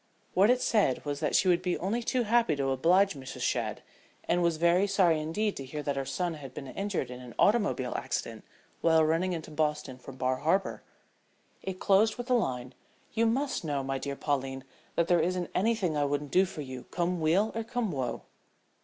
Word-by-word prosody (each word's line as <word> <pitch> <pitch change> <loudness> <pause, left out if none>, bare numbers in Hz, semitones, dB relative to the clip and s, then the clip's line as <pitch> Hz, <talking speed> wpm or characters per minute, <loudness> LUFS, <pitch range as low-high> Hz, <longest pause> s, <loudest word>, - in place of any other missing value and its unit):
What 195 +4 +5
it 250 0 +3
said 200 - +2
was 145 -1 -2
that - - 0
she 190 - +4
would 175 -1 +4
be 180 -1 -1
only 210 +7 -1
too 245 +1 0
happy 230 -7 +3
to 135 -1 -1
oblige 180 +9 +3
Mrs. 135 -3 -8
Shadd, - - -1 0.4
and 175 - +1
was 170 -2 +2
very 170 +4 +3
sorry 180 -5 +3
indeed 205 +7 -1
to 135 - -5
hear 150 +3 -6
that 145 -1 -1
her 135 0 -2
son 175 -2 -1
had 135 -4 -10
been 140 - -6
injured 185 -2 -3
in 125 - -7
an 125 -1 -11
automobile 205 - +2
accident - - -3 0.4
while 160 -1 +4
running 165 +4 +1
into 160 -2 -6
Boston 150 -4 -1
from 130 +1 -10
Bar 130 0 0
Harbor. 175 +8 0 0.8
It 190 -1 -5
closed 210 +2 +4
with 245 - -4
the 255 - +1
line, 130 - -1 0.4
"you 230 +1 +2
must 265 +2 0
know, 145 -3 -1
my 135 0 -2
dear 140 +1 -4
Pauline, 135 -2 -2 0.3
that 170 - +2
there 175 -2 +4
isn't 180 +1 -1
anything 195 -5 +1
I 145 -1 +2
wouldn't 145 0 -2
do 190 +1 +5
for 160 - -7
you, 130 -3 -7
come 175 -1 -1
weal 185 +8 +3
or 225 - -2
come 235 -2 -2
woe." 130 -5 -3
170 Hz, 205 wpm, -29 LUFS, 140-195 Hz, 0.8 s, What